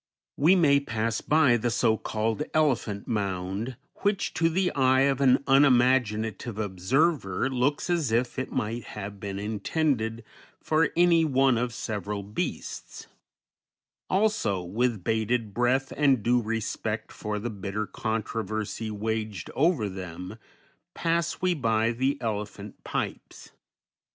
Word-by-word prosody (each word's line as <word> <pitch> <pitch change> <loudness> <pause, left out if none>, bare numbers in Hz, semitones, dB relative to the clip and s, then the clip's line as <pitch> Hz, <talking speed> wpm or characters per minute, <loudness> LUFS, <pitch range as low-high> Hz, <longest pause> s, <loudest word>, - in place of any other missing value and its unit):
_ - - -68 0.3
We 165 +7 +5
may 145 -6 +5
pass 115 -4 -2
by 145 -6 +4
the 120 +1 -1
so 115 -1 +2
called 110 +4 -2
"Elephant 125 -10 +1
Mound," 100 +2 -2 0.2
which 200 0 0
to 165 - +2
the 180 +2 +1
eye 130 -1 +4
of 135 0 +2
an 130 0 +4
unimaginative 125 -5 +3
observer 110 - 0
looks 130 +3 0
as 170 -9 0
if 120 +2 0
it 130 - -4
might 115 +2 -2
have 100 0 -6
been 100 -1 -5
intended 110 - -1 0.4
for 155 0 +2
any 170 -1 +5
one 135 -3 +3
of 120 +1 -1
several 105 -2 -4
beasts; 105 +2 -5 1.0
also, 190 - +1
with 110 +2 -1
bated 110 0 0
breath 125 +4 +1
and 135 -6 +3
due 120 +2 +3
respect 115 -1 -3
for 105 0 -4
the 115 +3 -4
bitter 100 +1 -3
controversy 110 +1 -3
waged 110 -3 -3
over 150 - +2
them, 95 +2 -7 0.6
pass 170 0 0
we 180 -1 +3
by 115 -6 +1
the 135 +4 0
elephant 105 -2 -5
pipes. - - -5
115 Hz, 130 wpm, -27 LUFS, 105-135 Hz, 1.0 s, We